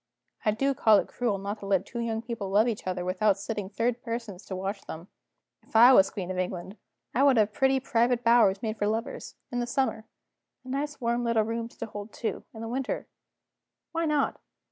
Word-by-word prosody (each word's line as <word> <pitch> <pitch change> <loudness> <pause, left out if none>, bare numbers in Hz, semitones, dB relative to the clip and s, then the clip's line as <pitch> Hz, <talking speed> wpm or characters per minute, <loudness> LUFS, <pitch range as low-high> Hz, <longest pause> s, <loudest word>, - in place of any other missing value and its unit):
I - - +2
do 270 +6 +1
call 220 -4 +5
it - - 0
cruel 235 -5 -1
not 200 +2 -4
to 200 - -8
let 195 -1 +2
two 235 - -6
young 225 -1 -2
people 230 -5 -4
love 210 +4 +4
each 220 -5 -3
other, 180 -1 -2
without 195 +2 +2
setting 205 -1 -4
third 235 +3 -1
persons 230 -5 -5
to 190 - -4
watch 195 +2 -3
them. 165 +5 -8 0.5
If - - -24
I 240 +4 +9
was 195 -4 +6
Queen 185 -2 -5
of 185 - -3
England, 185 +1 -4 0.4
I 250 - +2
would 275 -3 +5
have 215 -1 +3
pretty 265 +2 +3
private 245 -1 +1
bowers 230 -4 +4
made 220 -1 -3
for 205 - +1
lovers, 225 +5 -3 0.2
in 245 - -1
the 240 - -1
summer, 240 -5 -1 0.6
and 255 - -8
nice 290 +1 -3
warm 235 -1 0
little 230 -2 +2
rooms 230 +1 -4
to - - -4
hold 210 -1 -8
two, 230 - -3
in 220 - -10
the 225 - -4
winter. 255 +3 -2 0.9
Why 330 0 -1
not? 300 -2 +1
225 Hz, 210 wpm, -28 LUFS, 200-240 Hz, 0.9 s, I